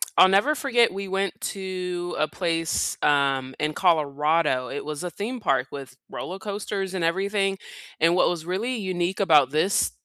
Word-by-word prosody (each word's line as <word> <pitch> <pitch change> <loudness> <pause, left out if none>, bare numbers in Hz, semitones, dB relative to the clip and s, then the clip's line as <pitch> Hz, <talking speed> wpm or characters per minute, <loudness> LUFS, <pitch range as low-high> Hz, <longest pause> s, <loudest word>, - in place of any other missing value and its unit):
I'll - - +8
never 200 +11 +3
forget 245 -8 +2
we 195 0 -5
went 195 -1 -2
to 180 -2 -4
a 155 - +2
place, 165 -1 -1
um, 135 -2 +1
in 150 0 -1
Colorado. 150 -5 +1
It 145 - -5
was 150 +2 -5
a 180 - -3
theme 220 +8 -5
park 135 - 0
with 135 -2 -8
roller 185 - -6
coasters 200 -1 -4
and 185 - -2
everything, 195 +3 0 0.4
and 165 +2 +4
what 180 - +4
was 170 -2 -4
really 205 +8 -2
unique 185 -2 -2
about 150 -9 +5
this, 155 +7 +1
180 Hz, 165 wpm, -25 LUFS, 150-195 Hz, 0.4 s, I'll